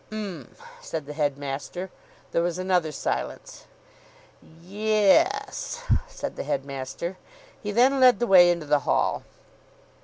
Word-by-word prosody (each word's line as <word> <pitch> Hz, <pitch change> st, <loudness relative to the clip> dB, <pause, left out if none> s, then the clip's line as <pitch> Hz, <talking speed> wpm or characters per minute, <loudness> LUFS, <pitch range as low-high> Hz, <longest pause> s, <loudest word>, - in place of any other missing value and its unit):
"'M!" 195 Hz, -, -7 dB, 0.3 s
said 160 Hz, -3 st, -5 dB
the 150 Hz, -, -7 dB
headmaster. 145 Hz, +5 st, -3 dB, 0.4 s
There 170 Hz, -, +1 dB
was 175 Hz, 0 st, -1 dB
another 180 Hz, -4 st, +1 dB
silence. 150 Hz, -, -4 dB, 1.0 s
"Ye 210 Hz, +2 st, +1 dB
e 335 Hz, -, +2 dB
s!" 425 Hz, +4 st, -6 dB, 0.2 s
said -, -, -6 dB
the -, -, -3 dB
headmaster. 140 Hz, +6 st, -4 dB, 0.4 s
He 210 Hz, -, -5 dB
then 255 Hz, +5 st, +4 dB
led 255 Hz, -1 st, +7 dB
the 240 Hz, -, 0 dB
way 180 Hz, -5 st, +7 dB
into 170 Hz, -3 st, 0 dB
the 150 Hz, 0 st, +3 dB
Hall. 135 Hz, -, 0 dB
180 Hz, 130 wpm, -25 LUFS, 150-215 Hz, 1.0 s, led